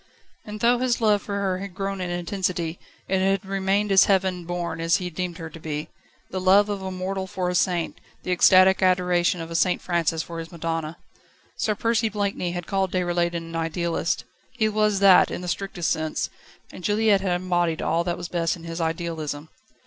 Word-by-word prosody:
And 210 Hz, 0 st, -7 dB
though 240 Hz, +1 st, +4 dB
his 250 Hz, -1 st, +1 dB
love 210 Hz, -3 st, +3 dB
for 200 Hz, -, -5 dB
her 190 Hz, -2 st, -1 dB
had 195 Hz, -2 st, -7 dB
grown 195 Hz, -1 st, -3 dB
in 180 Hz, -, -3 dB
intensity, 175 Hz, -1 st, -2 dB, 0.3 s
it 190 Hz, 0 st, +1 dB
had 195 Hz, +1 st, +1 dB
remained 195 Hz, +1 st, 0 dB
as 195 Hz, 0 st, +7 dB
heaven 190 Hz, -3 st, +1 dB
born 170 Hz, -1 st, -3 dB
as 165 Hz, 0 st, +3 dB
he 180 Hz, -1 st, -2 dB
deemed 175 Hz, 0 st, -4 dB
her 165 Hz, -, -6 dB
to 165 Hz, -, -10 dB
be 155 Hz, 0 st, -4 dB, 0.4 s
the 185 Hz, -, -3 dB
love 200 Hz, +3 st, +5 dB
of 200 Hz, -1 st, -3 dB
a 190 Hz, -, -4 dB
mortal 190 Hz, +1 st, -3 dB
for 185 Hz, -2 st, -2 dB
a -, -, -1 dB
saint, 175 Hz, -2 st, 0 dB, 0.2 s
the 185 Hz, -, -3 dB
ecstatic 185 Hz, +2 st, +6 dB
adoration 180 Hz, -2 st, +2 dB
of 165 Hz, 0 st, -7 dB
a -, -, -4 dB
St 180 Hz, +2 st, +2 dB
Francis 165 Hz, -2 st, 0 dB
for 170 Hz, -1 st, -7 dB
his 165 Hz, +1 st, -7 dB
Madonna. 165 Hz, -1 st, -3 dB, 0.6 s
Sir 215 Hz, -, 0 dB
Percy 230 Hz, +1 st, +1 dB
Blakeney 200 Hz, -4 st, -2 dB
had 175 Hz, -1 st, -4 dB
called 195 Hz, -2 st, 0 dB
Déroulède 175 Hz, -1 st, 0 dB
an 165 Hz, 0 st, -5 dB
idealist. 165 Hz, +1 st, -1 dB, 0.3 s
He 240 Hz, -4 st, 0 dB
was 210 Hz, -2 st, +1 dB
that, 195 Hz, -2 st, +7 dB
in -, -, -5 dB
the 180 Hz, -, -6 dB
strictest 180 Hz, -1 st, -2 dB
sense, 155 Hz, -1 st, -2 dB, 0.4 s
and 180 Hz, -, -11 dB
Juliette 210 Hz, -1 st, +3 dB
had 190 Hz, -2 st, 0 dB
embodied 175 Hz, -3 st, 0 dB
all 165 Hz, +1 st, +1 dB
that 175 Hz, -1 st, -2 dB
was -, -, -5 dB
best 170 Hz, -1 st, 0 dB
in 170 Hz, -, -13 dB
his 165 Hz, 0 st, -5 dB
idealism. 160 Hz, -2 st, -3 dB
180 Hz, 200 wpm, -24 LUFS, 170-195 Hz, 0.6 s, as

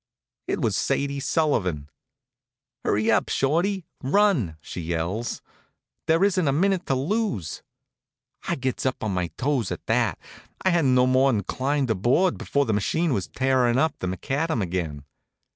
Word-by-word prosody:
It -, -, -1 dB
was -, -, +1 dB
Sadie 140 Hz, 0 st, 0 dB
Sullivan. 100 Hz, -, 0 dB, 1.0 s
"Hurry 105 Hz, +2 st, +2 dB
up, -, -, +2 dB
Shorty! 170 Hz, +7 st, +1 dB, 0.2 s
Run!" 135 Hz, -, +2 dB
she 90 Hz, -, -7 dB
yells. 85 Hz, +8 st, -3 dB, 0.6 s
"There 165 Hz, +3 st, +3 dB
isn't 185 Hz, -5 st, +2 dB
a -, -, +3 dB
minute 185 Hz, +5 st, +1 dB
to 135 Hz, -, +2 dB
lose." 140 Hz, -, -2 dB, 0.9 s
I -, -, +1 dB
gets 130 Hz, -2 st, -2 dB
up 130 Hz, -3 st, -1 dB
on 105 Hz, -3 st, -1 dB
my 90 Hz, -1 st, 0 dB
toes 130 Hz, -6 st, 0 dB
at -, -, -5 dB
that, -, -, +1 dB
and -, -, -18 dB, 0.2 s
I -, -, +5 dB
hadn't 145 Hz, -7 st, +3 dB
no 125 Hz, 0 st, +5 dB
more'n 130 Hz, -4 st, +3 dB
climbed 135 Hz, -1 st, -1 dB
aboard 125 Hz, -, +2 dB
before 140 Hz, 0 st, 0 dB
the 110 Hz, -, 0 dB
machine 155 Hz, -, +1 dB
was 95 Hz, -6 st, -1 dB
tearin' 130 Hz, -2 st, +2 dB
up 160 Hz, +4 st, +2 dB
the 95 Hz, -, -3 dB
macadam 135 Hz, -, -1 dB
again. 85 Hz, -5 st, -3 dB
130 Hz, 155 wpm, -25 LUFS, 105-160 Hz, 1.0 s, I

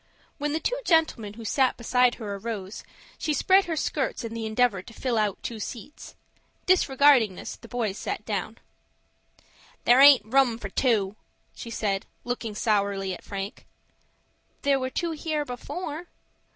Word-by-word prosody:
When 295 Hz, +1 st, -1 dB
the 315 Hz, -, 0 dB
two -, -, -1 dB
gentlemen 315 Hz, -, +1 dB
who 230 Hz, 0 st, -9 dB
sat 260 Hz, +3 st, +2 dB
beside 250 Hz, +1 st, +2 dB
her 210 Hz, -4 st, -5 dB
arose, 200 Hz, -1 st, -6 dB, 0.4 s
she 305 Hz, -, 0 dB
spread 380 Hz, +6 st, +4 dB
her 335 Hz, -2 st, -2 dB
skirts 290 Hz, -4 st, -2 dB
in 230 Hz, -1 st, -5 dB
the 225 Hz, -1 st, -3 dB
endeavor 220 Hz, -3 st, +2 dB
to 230 Hz, -, -14 dB
fill 215 Hz, -6 st, 0 dB
two 230 Hz, -2 st, -5 dB
seats. 235 Hz, +6 st, -8 dB, 0.5 s
Disregarding 275 Hz, -, +4 dB
this, -, -, -7 dB
the 230 Hz, -, -14 dB
boys 225 Hz, -5 st, -2 dB
sat 210 Hz, -, -4 dB
down. 215 Hz, +1 st, -3 dB, 1.3 s
"There 245 Hz, +2 st, +6 dB
aint 280 Hz, -5 st, +9 dB
room 250 Hz, 0 st, +3 dB
for -, -, -6 dB
two," 215 Hz, -5 st, +1 dB, 0.4 s
she 230 Hz, -, -8 dB
said, 200 Hz, -3 st, -2 dB, 0.2 s
looking 240 Hz, -3 st, -4 dB
sourly 200 Hz, -3 st, 0 dB
at -, -, -9 dB
Frank. 200 Hz, +2 st, -6 dB, 1.0 s
"There 280 Hz, -1 st, +3 dB
were 260 Hz, 0 st, -2 dB
two 335 Hz, +5 st, -2 dB
here 310 Hz, -1 st, -2 dB
before." 305 Hz, +6 st, -6 dB
235 Hz, 150 wpm, -26 LUFS, 210-285 Hz, 1.3 s, aint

